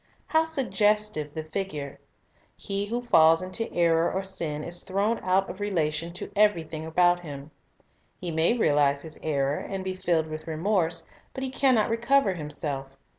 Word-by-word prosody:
How 320 Hz, 0 st, +2 dB
suggestive 210 Hz, -, 0 dB
the 160 Hz, -, -3 dB
figure! 155 Hz, -4 st, -5 dB, 0.6 s
He 200 Hz, 0 st, -2 dB
who 240 Hz, +3 st, -2 dB
falls 165 Hz, -6 st, +5 dB
into 185 Hz, +5 st, -3 dB
error 170 Hz, -1 st, +2 dB
or 190 Hz, -, -2 dB
sin 165 Hz, -6 st, -2 dB
is 175 Hz, +2 st, -4 dB
thrown 200 Hz, +4 st, 0 dB
out 190 Hz, +1 st, +1 dB
of 190 Hz, -, -8 dB
relation 165 Hz, -5 st, -1 dB
to 180 Hz, -, -7 dB
everything 165 Hz, -6 st, +1 dB
about 175 Hz, +2 st, +3 dB
him. 145 Hz, -3 st, -9 dB, 0.7 s
He 175 Hz, -2 st, -4 dB
may 165 Hz, +9 st, +2 dB
realize 145 Hz, -7 st, +2 dB
his 160 Hz, -1 st, -9 dB
error, 140 Hz, -2 st, 0 dB
and 195 Hz, -1 st, -5 dB
be 190 Hz, 0 st, -2 dB
filled 170 Hz, -3 st, 0 dB
with 155 Hz, 0 st, -7 dB
remorse; 165 Hz, 0 st, 0 dB, 0.3 s
but 265 Hz, -, -4 dB
he 260 Hz, -, -3 dB
can 265 Hz, -1 st, +3 dB
not 220 Hz, 0 st, +2 dB
recover 235 Hz, -2 st, +3 dB
himself. 145 Hz, -4 st, -4 dB
175 Hz, 165 wpm, -27 LUFS, 155-205 Hz, 0.7 s, falls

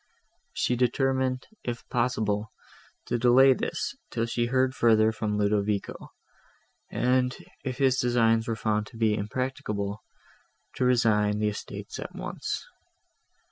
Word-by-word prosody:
She 125 Hz, -, +1 dB
determined, 130 Hz, +1 st, +1 dB, 0.2 s
if 120 Hz, -1 st, -5 dB
possible, 110 Hz, -3 st, 0 dB, 0.5 s
to 120 Hz, -, -1 dB
delay 130 Hz, +3 st, +6 dB
this, -, -, -3 dB
till 115 Hz, -, -1 dB
she 120 Hz, 0 st, -1 dB
heard 130 Hz, +1 st, +2 dB
further 110 Hz, -2 st, +4 dB
from 105 Hz, -1 st, -2 dB
Ludovico, 105 Hz, 0 st, -1 dB, 0.8 s
and, 125 Hz, 0 st, +1 dB, 0.3 s
if 130 Hz, -2 st, -3 dB
his 135 Hz, -1 st, +3 dB
designs 115 Hz, -2 st, +2 dB
were 115 Hz, -, -1 dB
found 105 Hz, -1 st, -1 dB
to 120 Hz, -, -13 dB
be 110 Hz, -2 st, +2 dB
impracticable, 105 Hz, -2 st, -3 dB, 0.8 s
to 130 Hz, -, +1 dB
resign 105 Hz, -4 st, +3 dB
the 105 Hz, 0 st, +1 dB
estates 105 Hz, -, -7 dB
at -, -, -7 dB
once. -, -, -4 dB
115 Hz, 125 wpm, -27 LUFS, 105-125 Hz, 0.8 s, delay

